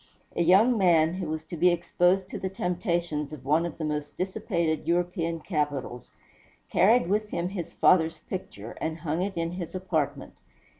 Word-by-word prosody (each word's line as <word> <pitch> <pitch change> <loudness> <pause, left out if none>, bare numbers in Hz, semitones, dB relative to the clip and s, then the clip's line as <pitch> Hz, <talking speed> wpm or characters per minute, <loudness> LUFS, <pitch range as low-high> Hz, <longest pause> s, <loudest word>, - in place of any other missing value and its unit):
A - - +1
young 210 +8 +5
man, 165 -3 +4
who 185 +1 -4
was 155 0 -4
to - - -7
be 175 +3 +4
exposed 175 +2 +2
to - - -5
the 190 - -3
temptations 175 -5 -2
of 135 -4 -10
one 155 +4 +2
of 165 - -9
the 160 - -3
most 150 -1 -4
dissipated 170 -4 -1
European 170 -1 0
capitals, 145 - -3 0.6
carried 225 +4 +5
with 210 +2 0
him 175 -2 -2
his 175 -4 -6
father's 165 -3 +4
picture, 115 - -7
and 160 0 -3
hung 165 +1 -1
it 190 -1 -3
in 165 0 -1
his 175 -1 -6
apartment. 180 -6 -2
170 Hz, 170 wpm, -27 LUFS, 155-185 Hz, 0.6 s, young